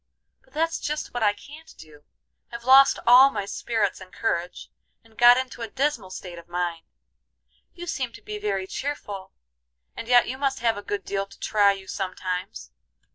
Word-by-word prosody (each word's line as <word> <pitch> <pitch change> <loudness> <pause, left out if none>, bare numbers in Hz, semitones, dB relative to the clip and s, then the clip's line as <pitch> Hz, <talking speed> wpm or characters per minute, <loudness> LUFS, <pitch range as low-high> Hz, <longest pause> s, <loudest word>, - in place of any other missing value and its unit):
"But - - -28
that's 325 +2 0
just 300 +1 -4
what 245 - -3
I 205 -2 +3
can't 300 +8 -14
do. 150 -2 -16 0.5
I've 235 0 -8
lost 270 +2 +7
all 255 +3 +8
my 205 -6 -4
spirits 205 -2 -2
and 185 0 -12
courage, 180 -5 -3 0.3
and 225 -1 -23
got 240 +1 +7
into 260 -2 -4
a 230 - -3
dismal 270 -6 -1
state 180 -2 -8
of 170 - -16
mind. 175 -1 -3 0.9
You 350 -1 -7
seem 265 -8 -3
to - - -13
be 210 0 -6
very 200 -2 -2
cheerful, 205 -5 -5 0.6
and 230 - -7
yet 245 0 +5
you 260 +2 -5
must 275 -1 0
have 230 -1 +2
a 205 - -6
good 200 -2 -4
deal 195 0 -2
to - - -17
try 205 -2 +3
you 195 -1 -10
sometimes. 185 - -5
210 Hz, 185 wpm, -25 LUFS, 190-260 Hz, 0.9 s, all